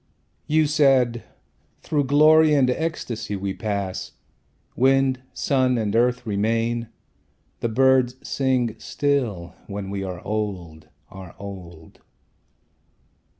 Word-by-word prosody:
You 155 +1 +3
said, 135 -5 +2 0.6
"Through 145 -3 0
glory 155 +2 +5
and 135 -3 +4
ecstasy 125 -9 -3
we 95 0 -3
pass; 100 -1 -4 0.6
Wind, 135 0 +2
sun, 130 -2 +1
and 110 -2 -1
earth 125 +1 +2
remain, 115 +3 -1 0.7
the 115 - -1
birds 130 +1 +3
sing 130 -4 0
still, 125 -14 -2
When 100 -1 -6
we 100 -1 -3
are 90 -2 -6
old, 95 -7 -4 0.2
are 95 -3 -11
old. 90 -5 -11
120 Hz, 105 wpm, -23 LUFS, 100-135 Hz, 0.7 s, glory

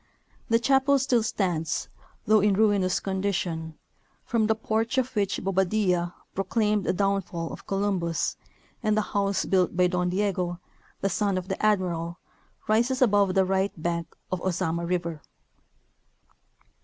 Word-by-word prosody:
The 230 - +5
chapel 270 +3 +3
still 255 -3 +2
stands, 175 -7 -1 0.4
though 215 0 +5
in 205 -1 +3
ruinous 200 -3 +2
condition, 185 -5 -2 0.5
from 225 -2 +1
the 220 - +2
porch 225 +3 -1
of 260 -1 0
which 200 -2 0
Bobadilla 185 -2 +1 0.2
pro 195 - -1
claimed 210 0 +1
the - - +2
downfall 185 -3 -1
of - - -11
Columbus, 195 -4 0 0.5
and 215 -2 +1
the 215 - +2
house 200 -1 +1
built 185 -2 +1
by 180 - +5
Don 180 0 0
Diego, 180 -2 -1 0.4
the 195 - +1
son 200 0 0
of 185 0 -5
the 190 - -3
Admiral, 175 -5 +1 0.5
rises 235 +4 +2
above 205 -6 +3
the 190 -1 +4
right 190 +1 0
bank 170 0 -3 0.2
of 185 -1 -2
Ozama 170 -2 -1
river. 170 -3 -2
195 Hz, 145 wpm, -26 LUFS, 180-215 Hz, 0.5 s, The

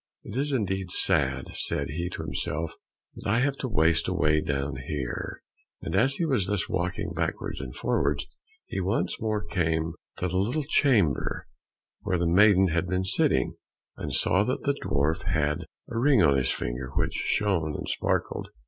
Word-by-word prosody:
"It 100 - -8
is 145 +3 0
indeed 95 -7 -1
sad," 70 -5 +2
said 70 -1 0
he 85 +4 -2
to - - -5
himself, 80 +2 -3 0.4
"that - - -6
I 110 - +3
have 135 +3 +2
to 130 - -3
waste 80 -7 +2
away 75 +1 +2
down 70 -2 -2
here," 65 -1 -4 0.4
and 85 - -4
as 130 +7 +4
he 170 - 0
was 130 - +1
thus 100 -2 0
walking 90 0 -2
backwards - - -3
and 65 -2 -7
forwards, 70 0 0 0.4
he - - -4
once 95 +5 -1
more 110 -1 -1
came 80 -4 0 0.2
to 90 - -1
the 90 +1 0
little 125 +10 0
chamber 110 - +2 0.6
where 95 -3 0
the 85 - 0
maiden 95 +1 +5
had 85 +2 0
been 90 +1 0
sitting, 95 - +2 0.4
and - - -5
saw 95 - +3
that 130 +5 -2
the 140 - +2
dwarf 70 +4 +1
had 75 -1 0 0.2
a 115 - -2
ring 135 -3 +5
on 70 - +5
his 65 -2 +1
finger 60 +2 -3
which - - +1
shone 90 -8 0
and - - -5
sparkled. - - -1
90 Hz, 175 wpm, -27 LUFS, 75-105 Hz, 0.6 s, maiden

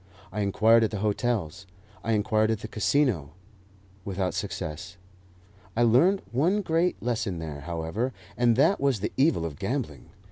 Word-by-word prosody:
I 105 +3 -3
inquired 110 +3 +4
at 110 - +2
the 105 - -4
hotels; 105 -5 -1 0.4
I 115 - 0
inquired 110 0 +2
at 110 -2 -1
the - - -5
Casino 110 - 0 0.7
without 95 -1 -2
success. 85 +4 -5 0.8
I 120 - +3
learnt 165 - +4
one 180 - +2
great 170 +1 +1
lesson 115 -6 -1
there, 80 -3 -6
however, 85 - -3 0.2
and 120 -1 +3
that 140 - +3
was 135 -7 +1
the - - -2
evil 135 - +2
of 75 -4 -6
gambling. - - -4
110 Hz, 150 wpm, -27 LUFS, 90-125 Hz, 0.8 s, inquired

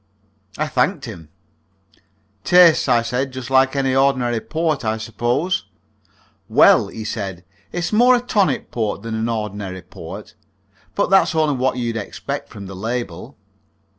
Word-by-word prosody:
I 155 - 0
thanked 160 0 0
him. 85 -10 -10 1.1
"Tastes," 175 -2 +5
I 120 -1 +4
said, 125 +3 -2
"just 130 0 -7
like 135 +1 +4
any 135 -1 +1
ordinary 130 -3 +2
port, 160 +1 -2
I 110 0 -1
suppose?" 120 +10 -1 0.8
"Well," - - +5
he 110 - -7
said, 95 -5 -5 0.3
"it's 175 +3 -3
more 245 +3 +6
a - - +2
tonic 210 -5 0
port 110 -3 -2
than 115 0 -5
an 110 +1 -1
ordinary 105 -4 -4
port. - - -10 0.6
But - - 0
that's 195 -3 +4
only 155 -3 +2
what 130 0 0
you'd 120 -2 -2
expect 105 - -5
from 100 - -9
the 95 0 -8
label." 115 -3 -5
125 Hz, 145 wpm, -20 LUFS, 110-155 Hz, 1.1 s, more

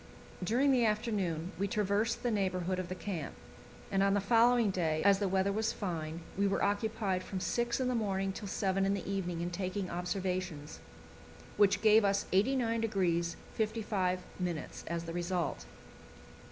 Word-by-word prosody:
During 250 +9 +3
the 250 -3 +4
afternoon 205 -7 0
we 200 - +1
traversed 210 +2 0
the 240 - +1
neighbourhood 185 -3 0
of 180 -2 -4
the 185 - -3
camp, 180 -6 -5 0.6
and 195 -1 +2
on 195 0 +3
the - - +3
following 230 +1 +4
day, 160 -4 0
as 200 -1 +6
the 200 - +1
weather 190 +1 +1
was 220 +2 0
fine, 165 -4 -4
we 200 +1 +2
were 195 - 0
occupied 205 -2 0
from 190 0 -5
six 235 +6 0
in 260 - +1
the 250 - +1
morning 195 -4 0
till 205 - -6
seven 195 0 0
in 195 +1 +2
the 195 - -5
evening 180 -4 -2
in 175 +1 -2
taking 185 +1 -3
observations, 180 -3 -3 0.8
which 205 0 +3
gave 220 0 +6
us 200 0 +2
89° 205 -7 +1 0.2
55' 210 -4 0 0.7
as 170 0 -2
the 165 0 -6
result. 175 - -2
195 Hz, 160 wpm, -32 LUFS, 180-215 Hz, 0.8 s, as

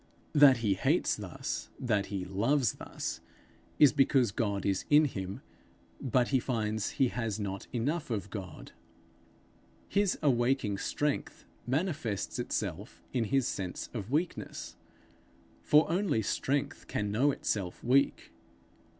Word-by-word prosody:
That 145 -3 +7
he 100 - +4
hates 95 - +1
thus, - - -5
that 105 -5 0
he 95 -3 -3
loves 115 +7 +1
thus, - - -5 0.6
is 145 -4 +7
because 135 -5 +3
God 100 -3 -1
is 95 -2 +1
in 150 +1 +6
him, 95 -7 -4 0.6
but 125 -1 +2
he 135 - +3
finds 110 -4 -2
he 130 -2 +4
has 115 -4 -3
not 100 -2 -4
enough 145 +7 -1
of 100 -4 -3
God. 95 -4 -7 1.2
His 200 -1 +1
awaking 120 -6 +2
strength 145 -1 -2 0.2
manifests 140 - -1
itself - - -4
in 120 -3 +1
his 135 +2 +1
sense 90 -2 -4
of 110 -3 -5
weakness, 160 +6 -2 0.9
for 150 +1 +5
only 175 - +1
strength 140 +7 -1
can 105 -1 -2
know 125 +8 +3
itself 100 -9 -2
weak. 135 +3 +2
120 Hz, 125 wpm, -31 LUFS, 100-140 Hz, 1.2 s, That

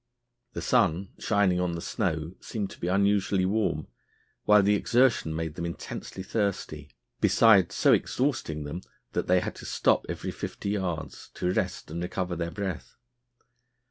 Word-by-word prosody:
The - - -5
sun 90 +5 +2
shining 100 -4 +2
on 90 -1 0
the 85 - -4
snow 85 -6 -2
seemed 105 -3 -4
to - - -12
be 85 - -3
unusually 100 0 +2
warm, 95 -6 0 0.6
while 105 -1 +6
the 100 +1 +4
exertion 115 -6 +2
made 80 -1 -3
them 85 - -6
intensely 90 +2 -6
thirsty, 95 -9 -2 0.3
besides 100 -6 +5
so - - +5
exhausting 120 - 0
them 75 +5 -5 0.3
that - - -2
they 90 0 +4
had - - -3
to - - -10
stop - - +2
every - - -4
fifty 100 - -5
yards 90 -6 -4
to 90 0 0
rest - - -2
and 85 +2 -4
recover 90 0 -2
their 85 0 -2
breath. 95 -2 -5
95 Hz, 155 wpm, -27 LUFS, 85-100 Hz, 0.6 s, while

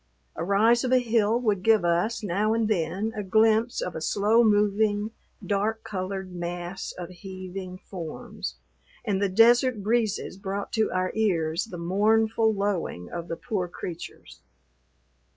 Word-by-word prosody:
A - - -3
rise 220 +6 +3
of 255 - -1
a 255 - +6
hill 230 -2 +2
would 210 -6 0
give 220 -3 +4
us, 175 +7 +1
now 210 +3 +1
and 225 -1 +1
then, 195 +2 -1
a 210 - -2
glimpse 220 +4 +2
of 180 - -4
a 160 - -4
slow 210 +7 +3
moving, 210 0 +2 0.3
dark 215 +2 -1
colored 190 -1 -4
mass 175 +1 -5
of 175 -1 -6
heaving 185 0 -8
forms, 175 -4 -7 0.5
and 200 -3 0
the 200 - +2
desert 235 +2 +4
breezes 220 -3 0
brought 195 +1 -4
to 220 -1 +1
our 185 0 0
ears 170 -5 0
the 185 -6 -8
mournful 220 +5 +2
lowing 195 - -2
of 170 0 -5
the 165 - -4
poor 200 -7 -2
creatures. 175 0 -8
200 Hz, 150 wpm, -26 LUFS, 180-220 Hz, 0.5 s, a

